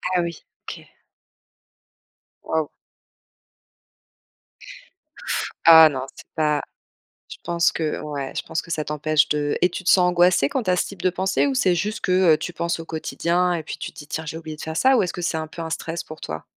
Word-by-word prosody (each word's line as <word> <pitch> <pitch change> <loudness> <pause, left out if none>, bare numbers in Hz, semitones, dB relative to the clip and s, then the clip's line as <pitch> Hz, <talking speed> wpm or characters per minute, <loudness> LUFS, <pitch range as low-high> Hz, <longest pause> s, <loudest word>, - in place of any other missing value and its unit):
Ah, 180 - +3
oui. 170 -2 -5 0.3
OK. - - -9 1.6
Waouh. 160 -2 -1 3.0
Ah 160 -1 +10
non, 130 -3 -4
c'est - - -14
pas 150 -2 +1 0.7
je - - -9
pense 170 0 +2
que 155 -2 -2
ouais. 140 -3 -5
Je - - -1
pense 160 - -3
que - - -15
ça 155 -2 -1
t'empêche 150 0 +1
de 145 -1 -1
et 180 - +4
tu 180 - -6
te 185 - -3
sens 180 -1 +5
angoissée 175 -5 +3
quand 255 - -2
tu 185 - 0
as 180 - +3
ce - - 0
type 200 - -10
de 185 - +3
pensées? 190 +7 0
Ou 275 - -1
c'est 190 -8 +2
juste 210 +6 -2
que, 185 - -1 0.2
heu, - - +1
tu 175 - -5
penses 170 0 -2
au - - -7
quotidien 170 +2 -1
et 165 - -3
puis - - -6
tu - - -7
te - - -19
dis: 145 - -9
«Tiens, 160 +1 -4
j'ai 160 - -5
oublié 160 -2 -7
de - - -10
faire 160 0 -5
ça», 265 +8 +4
ou - - +3
est-ce 180 - -2
que - - -7
c'est 165 - -1
un 160 0 -3
peu 165 +2 -8
un 160 - -5
stress 165 +1 -4
pour 155 - -11
toi? 80 0 -6
165 Hz, 215 wpm, -22 LUFS, 155-180 Hz, 3.0 s, Ah